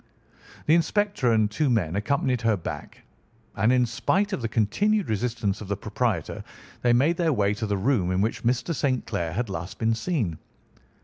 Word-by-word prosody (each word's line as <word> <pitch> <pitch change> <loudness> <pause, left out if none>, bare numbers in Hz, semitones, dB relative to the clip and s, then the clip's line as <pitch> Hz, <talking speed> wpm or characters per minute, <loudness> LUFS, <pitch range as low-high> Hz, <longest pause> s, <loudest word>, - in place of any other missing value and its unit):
The 155 - +4
inspector 170 - +2
and 110 -1 +4
two 145 +6 +1
men 95 -9 +1
accompanied 125 +3 0
her 115 -3 +2
back, 80 -3 -7 0.5
and 110 +5 +3
in 125 -1 +4
spite 190 - 0
of - - -2
the 115 - -1
continued 195 - +1
resistance 110 -2 -1
of 105 - -7
the 100 0 -2
proprietor, 105 -4 -2 0.4
they 120 - +3
made 145 +8 +3
their 170 -2 +2
way 100 -4 +2
to 110 +1 -3
the 100 -1 0
room 100 -3 +1
in 95 - +1
which 110 +3 0
Mr. 125 +7 0
St. 130 -5 0
Clair 85 -1 -2
had 120 +5 -1
last 95 +1 -6
been 115 0 +1
seen. 115 - -2
115 Hz, 185 wpm, -25 LUFS, 100-135 Hz, 0.5 s, The